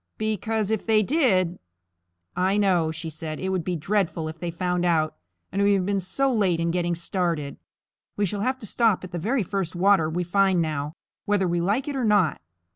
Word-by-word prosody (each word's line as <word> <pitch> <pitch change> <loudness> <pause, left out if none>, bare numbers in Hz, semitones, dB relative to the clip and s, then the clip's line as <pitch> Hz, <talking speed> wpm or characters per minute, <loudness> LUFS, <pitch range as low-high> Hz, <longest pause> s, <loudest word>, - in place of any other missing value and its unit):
Because 215 0 -1
if 220 - 0
they 220 -1 +3
did 190 - +2 0.4
" 85 0 -51
"I 200 - +1
know," 185 -6 +2
she 160 +1 -6
said. 155 0 -6
"It 190 - -2
would 185 -3 -1
be 180 +1 -2
dreadful 170 -1 -1
if 160 +1 -9
they 175 - -3
found 180 +1 -1
out; 155 -3 +1 0.4
and 200 - -1
we 200 0 +4
have 185 -2 0
been 200 0 0
so 265 +9 0
late 190 -7 +2
in 170 0 0
getting 175 0 0
started. 170 -4 -2 0.6
We 205 - +2
shall 200 +2 -3
have 260 +4 0
to - - -5
stop 220 -2 +2
at 185 - -8
the 175 - -3
very 230 +7 0
first 190 -2 -3
water 185 -3 +3
we 175 +3 -1
find 190 +1 +2
now, 155 -1 -2 0.3
whether 205 -2 +2
we 175 0 0
like 210 +10 0
it 290 - -3
or 260 - -1
not." 205 - +2
185 Hz, 210 wpm, -25 LUFS, 165-205 Hz, 0.6 s, we